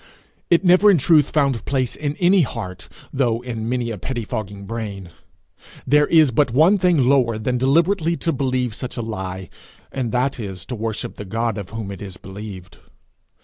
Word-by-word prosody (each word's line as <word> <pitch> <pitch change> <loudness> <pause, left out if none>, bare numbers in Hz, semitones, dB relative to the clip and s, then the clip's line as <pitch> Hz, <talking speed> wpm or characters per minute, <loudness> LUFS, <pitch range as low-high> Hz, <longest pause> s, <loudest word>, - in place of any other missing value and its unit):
It 170 +2 +3
never 185 +4 +6
in 195 - +6
truth 150 0 +4
found 140 -6 +1
place 130 -3 -1
in 145 -1 -3
any 180 +3 +4
heart, 95 - -5 0.2
though 120 -4 +1
in 115 -2 -4
many 120 -2 -1
a 105 - -6
pettifogging 105 -4 -5
brain. 100 -5 -6 0.7
There 150 +2 +4
is 155 -5 +5
but 140 +3 +2
one 160 - +4
thing 175 -8 +3
lower 125 -5 +3
than 125 +3 -1
deliberately 165 +5 +2
to 165 - -1
believe 130 -3 -1
such 125 +3 -6
a 120 - -2
lie, 95 -4 -5 0.4
and 130 -4 -3
that 125 +2 0
is 95 -5 -6
to 125 - -5
worship 110 -1 -4
the - - -6
God 115 +2 -2
of 100 - -7
whom 110 -3 -6
it 95 - -8
is 95 -3 -8
believed. 95 -2 -10
125 Hz, 180 wpm, -21 LUFS, 105-145 Hz, 0.7 s, never